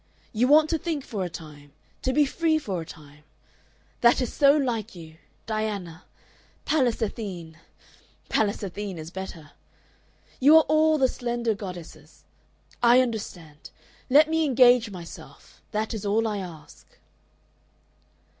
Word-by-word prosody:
You 235 +3 +2
want 305 +2 +6
to 325 - 0
think 320 -5 -3
for 205 -4 -4
a 180 - -3
time, 145 -3 -12 0.3
to 260 - 0
be 295 +2 +3
free 320 +3 +1
for 195 - -4
a - - -8
time. 150 -2 -14 0.8
That 235 0 +4
is 250 -3 -2
so 280 +1 +5
like 235 -7 -2
you, 160 -2 -12 0.3
Diana 205 -6 -4 0.6
Pallas 255 -8 +1
Athene! 180 -7 -6 0.7
(Pallas 210 -1 0
Athene 200 -1 -5
is 160 +1 -8
better.) 180 -6 -8 0.9
You 295 +5 +7
are 320 - +6
all 310 +1 +3
the 265 -2 +3
slender 240 -2 -2
goddesses. 180 -5 -10 0.6
I 240 +1 +6
understand. 180 -11 -4 0.4
Let 295 +4 +6
me 320 0 +1
engage 250 -4 +4
myself. 175 -4 -12
That 215 +2 -3
is 215 -2 -5
all 215 +2 +1
I 210 -2 -2
ask." 170 -5 -12
220 Hz, 135 wpm, -25 LUFS, 175-260 Hz, 0.9 s, You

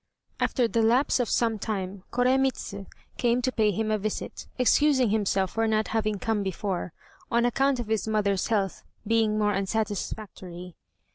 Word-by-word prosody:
After 245 -2 +2
the 230 0 +1
lapse 245 +5 +3
of 245 - 0
some 225 -2 +1
time 195 -2 -4
Koremitz 260 -1 +1 0.4
came 240 0 +2
to 255 - +1
pay 220 -4 +2
him 215 +2 -1
a 215 - +1
visit, 215 +1 -4
excusing 260 -2 +4
himself 195 -3 +1
for 225 0 0
not 215 0 +1
having 215 -2 0
come 220 +1 -1
before, 190 -2 -3 0.4
on 235 0 +2
account 270 +2 +2
of 240 - -2
his 220 0 -1
mother's 205 -3 +1
health 200 -4 0 0.2
being 220 -1 +2
more 210 -1 +2
unsatisfactory. 195 -3 -4
220 Hz, 155 wpm, -27 LUFS, 200-235 Hz, 0.4 s, excusing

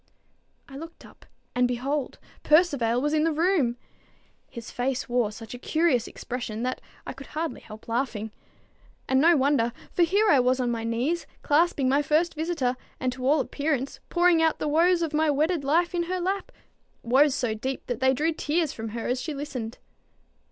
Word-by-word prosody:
I 275 - -10
looked 330 +3 -10
up, - - -18 0.3
and, 250 0 +3
behold, 260 +3 -2 0.2
Percivale 280 -8 +3
was 295 +3 0
in 310 0 +3
the 325 - +2
room! 310 -7 +1 0.7
His 235 -1 -9
face 260 +2 -2
wore 240 -3 +1
such 220 +1 -9
a 245 - -8
curious 310 -5 +1
expression 235 -3 -5
that 255 +1 -2 0.2
I - - -5
could - - -11
hardly 320 +1 -4
help 215 0 -12
laughing. 230 -3 -2 0.8
And 265 0 +3
no 335 +1 +6
wonder: 260 -4 +2 0.2
for - - 0
here 355 -4 +4
was 255 +1 +2
I - - +1
on 240 - 0
my 230 -1 -3
knees, 250 +9 -1 0.2
clasping 295 -2 +2
my 275 +3 +3
first 310 +4 +1
visitor, 310 -6 -1 0.2
and 255 -1 -1
to 255 0 -4
all 295 +2 +4
appearance 275 0 -2
pouring 345 -1 +4
out 320 -1 +2
the - - -2
woes 340 +3 +3
of 320 -2 -3
my 310 0 +2
wedded 305 +2 +1
life 335 +6 +2
in 345 -1 0
her 370 0 -1
lap, 385 +2 -2 0.5
woes 265 +4 +4
so 245 -6 -1
deep 260 +5 -4
that 245 - -3
they 260 0 +4
drew 320 +4 +1
tears 310 0 -1
from 225 0 -6
her 230 - -3
as 250 +1 -1
she 310 +2 -4
listened. 260 -5 -5
280 Hz, 185 wpm, -26 LUFS, 245-325 Hz, 0.8 s, no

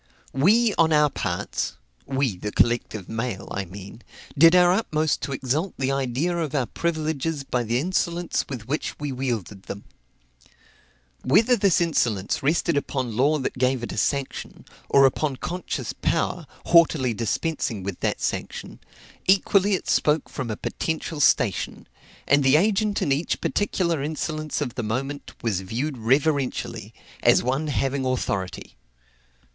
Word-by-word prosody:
We, 210 - +4
on 165 -1 +5
our 150 -2 +4
parts, 90 -8 -2 0.3
(we, 135 -6 0
the 105 +3 -5
collective 115 -5 +1
mail, 115 -3 -4
I 100 - -3
mean,) 100 +5 -10 0.3
did 165 +4 +7
our 180 0 +6
utmost 155 -7 0
to - - -4
exalt 140 +7 -1
the 135 0 0
idea 135 +6 -1
of 160 -4 -2
our 135 -3 +1
privileges 160 -1 -2
by 125 -2 -1
the 115 +1 0
insolence 175 +2 0
with 120 -5 -6
which 150 +4 -3
we 145 -1 -3
wielded 120 -7 -3
them. 100 - -7 1.4
Whether 220 - +4
this 200 -6 +3
insolence 120 - 0
rested 155 +2 +1
upon 130 -5 -2
law 145 +6 +3
that 130 -2 -4
gave 130 -1 +1
it - - -4
a - - -6
sanction, 140 -2 -2 0.2
or 135 0 +6
upon 135 +1 +1
conscious 180 +7 -4
power, - - -1 0.2
haughtily 160 -7 +4
dispensing 115 - -2
with 95 -2 -5
that - - -1
sanction, - - -4 0.5
equally 195 +1 +4
it - - -5
spoke 150 +1 +2
from 130 -4 -5
a 110 - -3
potential 160 -1 -3
station; 130 - +1 0.4
and 140 +1 +4
the 135 +2 +5
agent 205 +4 +2
in 140 - 0
each 145 +5 0
particular 175 -6 0
insolence 155 +1 -3
of 125 -5 -2
the 120 - -3
moment, 135 +6 -4
was 105 -5 0
viewed 125 +8 -3
reverentially, 135 +3 0 0.3
as - - +5
one 135 +5 0
having 135 +1 -1
authority. 100 -7 -3
140 Hz, 145 wpm, -24 LUFS, 120-160 Hz, 1.4 s, did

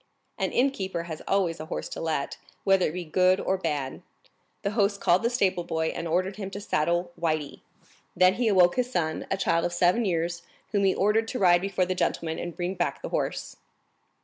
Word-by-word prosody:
An - - 0
innkeeper 195 -10 0
has 160 -2 -7
always 185 -4 +1
a 155 - -7
horse - - -4
to - - -6
let, 155 -4 -2 0.3
whether 195 -2 +4
it 155 - -4
be 180 -1 -4
good 185 +4 +3
or 190 - 0
bad. 150 -7 -3 0.6
The 200 - 0
host 200 -2 +1
called 175 +1 +3
the 235 - +1
stable 190 -7 +1
boy, 160 -1 -1
and 170 - -4
ordered 185 +4 0
him 195 -2 -5
to 195 - -6
saddle 175 -2 0
Le - - -20 0.2
Blanc 150 -2 -9 0.6
then 185 0 +5
he 235 +3 0
awoke 180 -2 +4
his 250 0 0
son, 160 -8 -1
a 195 - 0
child 170 -3 +1
of 175 - -1
seven 180 +6 +3
years, 170 -1 -1 0.3
whom 200 -2 +2
he 190 - +3
ordered 210 +3 +2
to 250 - -3
ride 175 -4 +5
before 190 -1 0
the 185 - -1
gentleman 165 -2 -1
and 175 -1 -5
bring 180 +1 -2
back 175 -6 -2
the - - -4
horse. - - -3
180 Hz, 210 wpm, -27 LUFS, 170-195 Hz, 0.6 s, then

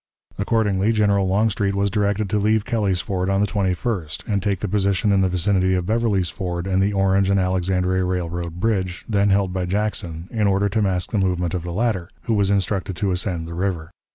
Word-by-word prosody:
Accordingly, 105 0 +1
General 100 -3 +2
Longstreet 100 +1 +1
was 100 0 +1
directed 105 -1 0
to 105 - +2
leave 110 +1 +2
Kelly's 105 -7 0
Ford 95 -2 -2
on 95 0 +2
the 105 - +3
21st, 95 -4 -2
and 100 -2 0
take 100 -2 -1
the 105 - -1
position 100 +1 +1
in 100 -1 +3
the 95 - +2
vicinity 95 +1 +1
of 90 -1 -1
Beverly's 105 -3 +1
Ford 90 -2 -4
and 95 0 +1
the 100 +2 +2
Orange 95 0 +2
and 100 0 +3
Alexandria 95 0 +1
Railroad 85 -1 -3
bridge, 95 -4 -1
then 100 -2 +2
held 100 -2 +2
by 90 -1 -1
Jackson, 90 -4 -2
in 110 -3 +1
order 100 +1 +2
to 110 +2 0
mask 95 -3 0
the 105 - +1
movement 90 -3 0
of 90 - -1
the 85 +1 -6
latter, 95 -3 -1
who 115 - -1
was 100 -2 +2
instructed 100 -1 0
to 100 +2 -1
ascend 90 -2 -2
the 85 - -7
river. 85 -2 -3
95 Hz, 210 wpm, -22 LUFS, 90-105 Hz, -, the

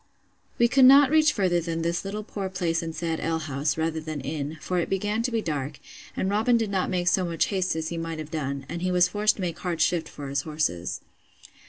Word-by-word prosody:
We 235 - +5
could 260 +2 +5
not 275 +1 +8
reach 310 -1 +5
further 185 -8 +1
than 165 0 -3
this 170 0 -1
little 205 +2 -4
poor 200 -2 -5
place 175 -3 -1
and 165 -1 -5
sad 165 -1 -2
alehouse, 155 -3 -1
rather 160 0 -1
than 155 -1 -5
inn; 145 +2 -4
for 180 +4 -1
it 170 - -2
began 205 +3 0
to 245 - 0
be 230 -2 -1
dark, 145 -2 -3 0.4
and - - 0
Robin 220 +4 +3
did 225 -3 -1
not 190 -2 0
make 180 -1 -1
so 185 +1 +3
much 170 -2 0
haste 185 -3 0
as 160 0 -2
he 170 - -4
might 165 -1 -4
have 155 -1 -7
done; 140 -3 -3
and 170 - -5
he 185 - 0
was 180 0 +4
forced 210 +2 +2
to - - -7
make 170 -3 -3
hard 175 -3 -3
shift 165 -2 +1
for 140 -2 -8
his 140 +1 0
horses. 150 - -2
170 Hz, 235 wpm, -26 LUFS, 160-195 Hz, 0.4 s, not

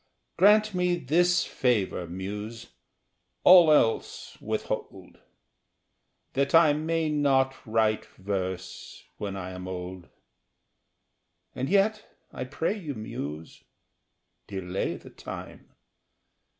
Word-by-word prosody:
Grant 210 +1 +5
me 180 -1 +1
this 175 +4 +2
favor, 105 -8 0
Muse 105 +6 -6 0.7
all 175 -3 +8
else 115 -7 +1
withhold - - -5 1.1
That 140 +3 +1
I 165 -3 +7
may 160 +1 -1
not 135 -3 +2
write 110 -1 +1
verse 95 -2 -5
when 100 -1 -4
I 95 -1 -6
am 90 0 -7
old. 90 -1 -7 1.5
And 130 +1 -3
yet 210 +3 +1 0.2
I 130 - -4
pray 160 +9 -2
you, 160 -10 -6
Muse, 80 -7 -7 0.8
delay 95 -1 -3
the - - -14
time! - - -9
125 Hz, 100 wpm, -27 LUFS, -, 1.5 s, all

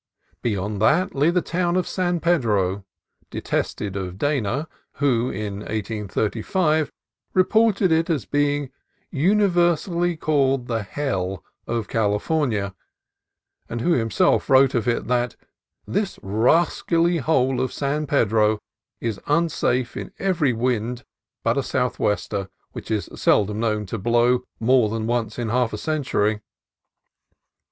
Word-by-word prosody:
Beyond 105 -2 -2
that 180 +12 +3
lay 145 +3 +3
the 175 0 +1
town 175 0 0
of 185 - +1
San 175 -2 0
Pedro, 105 - +1 0.5
detested 100 -2 -3
of 95 -2 -4
Dana, 140 +2 -1 0.3
who 125 -4 +1
in 100 0 -4
1835 110 - -1 0.4
reported 200 0 +3
it 160 +1 +2
as 145 - 0
being 145 +1 0 0.4
"universally 175 -1 +2
called 135 -5 +1
the 115 -2 -1
hell 95 - -3 0.2
of 115 -3 -2
California," 105 - 0 1.0
and 120 - -3
who 175 - +1
himself 115 -8 +2
wrote 135 0 +5
of 115 -2 0
it 120 - 0
that 125 -1 0 0.5
"This 200 -1 -2
rascally 165 - +2
hole 130 -3 +1
of 130 - -1
San 145 +2 -2
Pedro 110 -5 +2 0.4
is 115 -4 -3
unsafe 145 -5 +1
in - - -6
every 175 -8 +1
wind 120 0 -1 0.4
but - - +2
a - - +2
southwester, 100 -1 -1 0.2
which - - -9
is 110 -2 -1
seldom 105 +1 +2
known 110 -2 0
to 105 +3 -5
blow 120 +4 +2
more 120 -1 +3
than 110 0 -3
once 115 -2 -1
in 120 -2 -2
half 120 0 +1
a - - -2
century." 125 -9 0
125 Hz, 125 wpm, -23 LUFS, 110-155 Hz, 1.0 s, wrote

